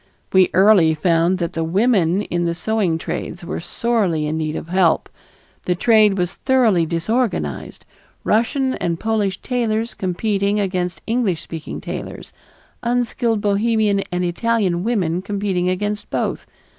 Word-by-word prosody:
We 190 -1 +5
early 185 -5 +5
found 170 +3 +2
that 170 -2 -3
the 165 - -1
women 190 0 +2
in 175 -2 -2
the 170 0 -1
sewing 195 -3 0
trades 170 +2 -5
were - - -4
sorely 190 -6 0
in 150 +1 -2
need 155 -1 -2
of 165 - -6
help. 180 -2 +2 0.6
The 180 - +1
trade 215 0 +4
was 180 0 -2
thoroughly 225 -11 +2
disorganized, 170 - -2 0.4
Russian 260 +4 +1
and 170 -6 -2
Polish 210 -4 -1
tailors 230 -2 -1
competing 200 +2 -1
against 180 -3 -2
English 225 -8 0
speaking 160 -2 -7
tailors, - - -7 0.5
unskilled 235 -2 0
Bohemian 210 0 +1
and 180 0 -1
Italian 185 -1 0
women 185 -7 0
competing 195 -3 -1
against 205 +3 -3
both. - - -2
195 Hz, 135 wpm, -20 LUFS, 175-220 Hz, 0.6 s, We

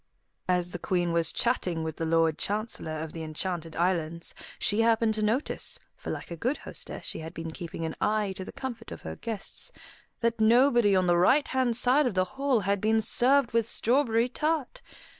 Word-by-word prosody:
As 180 -1 +2
the 175 - -4
Queen 175 -2 0
was 165 -1 +2
chatting 180 -9 0
with 160 -1 -4
the 165 - -2
Lord 165 -1 +2
Chancellor 205 -6 -3
of 155 0 -5
the 165 - -6
Enchanted 160 +1 -4
Islands, 170 -2 -1 0.2
she 210 +2 +1
happened 225 -1 +3
to 215 - -1
notice 225 +7 0 0.2
for - - -8
like - - -5
a - - -3
good 250 - -1
hostess - - -6
she - - -2
had 160 0 -8
been 165 0 -5
keeping 165 -1 -6
an 160 - -4
eye 210 -2 +1
to 190 0 -6
the - - -8
comfort 240 -4 -7
of - - -8
her - - -5
guests 225 - -2 0.5
that 230 -1 0
nobody 235 -2 +5
on 185 -1 +3
the 175 -1 +3
right 260 +12 +4
hand 255 -3 +1
side 255 +3 +3
of 225 - -3
the 185 0 +3
hall 270 -4 +1
had 200 0 0
been 220 +1 +3
served 250 +4 +3
with 230 -1 +1
strawberry 235 -2 +2
tart. 300 +1 -2
210 Hz, 195 wpm, -28 LUFS, 170-240 Hz, 0.5 s, nobody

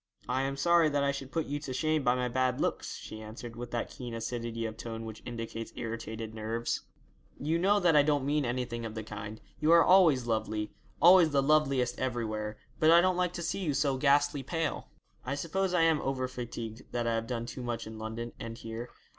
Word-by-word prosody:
'I 130 +1 +1
am 135 0 -2
sorry 170 +2 +4
that 145 -1 +1
I 140 - +2
should 140 -1 -6
put 160 +3 -1
you 145 +1 -3
to 140 -3 -5
shame 155 +4 +1
by 125 -1 +3
my 125 0 0
bad 130 0 0
looks,' - - -1
she 110 - -8
answered, 115 +2 -8
with 120 +1 -6
that 120 0 -3
keen 120 -4 -6
acidity 115 0 -3
of 110 -1 -4
tone 115 0 -6
which 110 -1 -8
indicates 115 -1 -5
irritated 115 -1 -5
nerves. 110 +2 -2 0.6
'You 160 +4 0
know 200 +3 +4
that 175 -4 +4
I 150 - +8
don't 145 -2 +1
mean 145 +1 +1
anything 120 -1 -2
of 110 -1 -5
the 110 - -4
kind; 105 0 -7 0.2
you 155 +2 +3
are 170 0 +8
always 165 -10 +5
lovely, 110 -2 -1 0.3
always 175 -1 +8
the 140 -2 +2
loveliest 135 -4 +2
everywhere; 110 -4 -2 0.2
but 155 - +5
I 170 +1 +8
don't 185 +1 +3
like 180 -1 0
to 175 - -4
see 165 - -2
you 155 -7 -1
so 140 0 +2
ghastly 145 +1 +3
pale.' 160 +3 -2 0.3
'I 135 +2 -2
suppose 185 +6 -1
I 180 -2 +3
am 160 -2 +3
over 130 -1 -1
fatigued: 120 -2 -6
that 120 -1 -1
I 115 - +1
have 115 0 -1
done 115 -1 -3
too 125 - -7
much 120 -1 -3
in 110 0 -8
London 115 +2 -5
and 115 0 -6
here. 115 +1 -6
125 Hz, 220 wpm, -30 LUFS, 115-150 Hz, 0.6 s, I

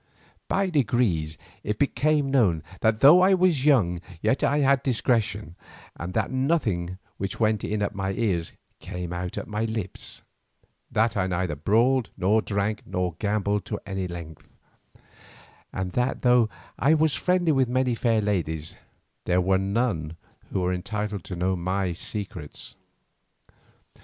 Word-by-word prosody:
By 195 -1 0
degrees 105 - +1 0.2
it 105 0 -2
became 145 0 +1
known 95 - +3 0.2
that 110 0 +1
though 155 +6 +8
I 190 +1 +5
was 185 -2 +3
so 145 - 0
young 90 - +3 0.2
yet 110 +8 +1
I 145 - +3
had 140 -1 +4
discretion, 110 - 0 0.4
and 90 +3 -6
that - - 0
nothing 120 - 0 0.2
which 95 -1 -4
went 110 -2 +2
in 105 -1 -1
at 100 - -2
my 95 -1 -2
ears 95 -6 -1 0.3
came 90 -1 -6
out 90 0 -4
of - - -3
my 105 +1 -2
lips; 110 -4 -5 0.7
that 110 +1 +1
I 95 -2 +1
neither 90 -3 -1
brawled 115 - +2
nor 105 +4 +3
drank 105 +1 -1
nor 90 -1 -1
gambled 105 -1 0
to - - -4
any 95 -2 -3
length, 85 -3 -9 1.2
and 95 -1 -3
that 125 +6 -1
though 125 -3 +5 0.3
I 150 +5 +4
was 155 -1 +2
friendly 180 -2 +2
with 135 -4 +2
many 130 0 +1
fair 115 -1 +1
ladies, 80 -6 -2 0.5
there 90 +1 +2
were 95 +1 +2
none 95 -6 -1 0.3
who 95 - 0
were 90 0 +1
entitled 105 +1 -3
to 90 - -5
know 90 +2 0
my 90 +1 -1
secrets. 90 -4 -7
105 Hz, 150 wpm, -25 LUFS, 90-125 Hz, 1.2 s, though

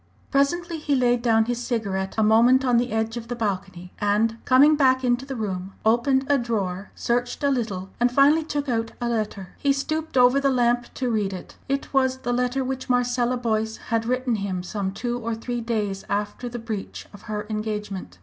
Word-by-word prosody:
Presently 330 +4 +1
he 290 -2 0
laid 245 -2 +2
down 225 -2 +3
his 240 0 -2
cigarette 200 -6 -2
a 220 - +3
moment 235 +5 +5
on 245 -2 +3
the 240 +1 0
edge 220 +1 -1
of 230 -1 -7
the 245 - -3
balcony, 190 -5 -4
and, 220 +3 +1
coming 280 +4 +6
back 260 -2 +3
into 245 +1 +1
the 270 - -4
room, 195 -4 -4
opened 265 +4 +3
a 285 -1 +3
drawer, 200 -5 -2
searched 245 +3 -1
a 280 - +3
little, 205 -7 -2
and 245 +1 +3
finally 285 +5 +5
took 290 -2 -3
out 225 -2 -1
a 240 - -2
letter. 215 -5 -2
He 280 - +2
stooped 310 +2 -2
over 250 +2 +6
the 275 0 +2
lamp 240 -2 +1
to 250 -2 -1
read 205 -3 0
it. 185 - -9
It 275 +1 -2
was 260 -1 +2
the 245 -2 -2
letter 250 +2 0
which 260 0 -4
Marcella 245 0 +1
Boyce 220 -2 -1 0.2
had 225 0 +1
written 250 -2 0
him 190 -3 -3
some 190 +1 -3
two 240 +4 -3
or 230 -1 -3
three 240 +1 -4
days 210 -4 -2
after 205 +4 -2
the 240 - -6
breach 225 -4 -6
of 205 - -12
her 210 -1 -3
engagement. 210 - -4
240 Hz, 200 wpm, -24 LUFS, 215-255 Hz, 0.2 s, coming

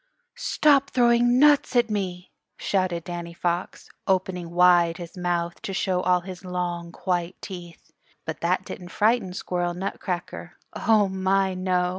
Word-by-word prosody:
"Stop 280 - +3
throwing 240 -1 +3
nuts 290 -1 +4
at 240 -2 +3
me!" 185 -3 -3 0.3
shouted 185 -3 -1
Danny 170 -1 -6
Fox, 175 +1 -3 0.2
opening 185 -2 0
wide 175 -1 +4
his 175 0 -9
mouth 175 -1 -2
to 195 - -5
show 185 -1 0
all 180 0 +2
his 185 0 -9
long, 175 -2 -3
white 180 -1 -1
teeth. 175 -3 -10 0.3
But - - -5
that - - 0
didn't 180 -4 -8
frighten 215 -1 +1
Squirrel 175 -1 -2
Nutcracker. 180 -1 -5 0.2
Oh, 215 -3 +3
my 190 0 +1
no! 180 -1 0
180 Hz, 140 wpm, -25 LUFS, 175-195 Hz, 0.3 s, nuts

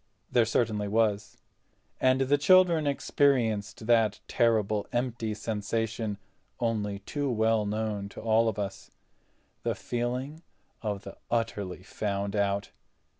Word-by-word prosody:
There 120 -2 +4
certainly 110 -2 0
was, 105 -1 0 0.6
and 130 0 +3
the 135 +2 +3
children 175 -2 +5
experienced 120 -7 +1
that 110 -3 +3
terrible 110 -3 +2
empty 120 -3 -1
sensation 110 0 -2 0.4
only 105 -4 -1
too 140 +8 -3
well 110 -2 +2
known 105 -1 -2
to - - -10
all 115 +1 +3
of 105 - -5
us—the 95 -3 -7
feeling 125 +6 -3 0.4
of 105 -3 -3
the 100 - -10
utterly 105 -6 -2
found 100 0 -3
out. 100 -1 0
110 Hz, 115 wpm, -29 LUFS, 105-120 Hz, 0.6 s, children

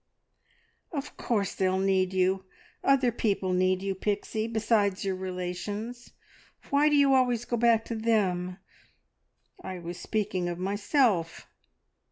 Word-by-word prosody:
"Of 290 -3 -5
course 205 -5 -1
they'll 190 -1 +1
need 190 -1 +2
you. 190 0 +1 0.4
Other 270 -3 +4
people 200 -5 0
need 185 +1 +2
you, 195 0 -1
Pixie, 210 +3 -2
besides 215 -3 +1
your 190 -1 0
relations. 190 +6 -5 0.6
Why 290 +2 +4
do 295 - +3
you 280 -1 +5
always 245 -3 +2
go 240 - -1
back 230 -1 +3
to 230 - -4
them? 190 -5 0 1.1
I 185 - -5
was 175 0 -7
speaking 195 -5 -1
of 175 - -4
myself. 200 - 0
200 Hz, 130 wpm, -28 LUFS, 185-235 Hz, 1.1 s, you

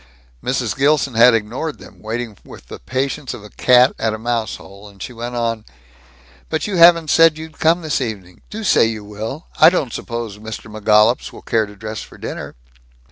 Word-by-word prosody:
Mrs. - - -1
Gilson 140 -1 +2
had 115 +1 +6
ignored 120 +8 -3
them, - - -15
waiting 115 0 -4
with 60 - -14
the - - -8
patience 135 - -3
of 105 - -12
a 105 - -13
cat 125 +1 +4
at 110 -1 0
a - - -7
mouse 115 0 -2
hole, 100 +2 -13
and 100 -1 -19
she 125 - -7
went 120 +1 -6
on, 115 -2 -2 0.9
"But 160 -1 -2
you 200 -3 -2
haven't 170 -2 +6
said 165 -1 +5
you'd 160 0 -10
come, 165 +2 +2
this 155 -3 -1
evening. 100 -7 -6
Do 220 +1 -6
say 195 - +4
you 110 -2 -3
will. 110 - -7
I - - +9
don't 150 -9 -2
suppose 115 -3 -5
Mr. 110 0 -8
McGollups 110 +2 +3
will - - -13
care 110 -2 0
to 105 - -13
dress 110 +1 -6
for - - -13
dinner?" - - -7
115 Hz, 195 wpm, -19 LUFS, 110-145 Hz, 0.9 s, I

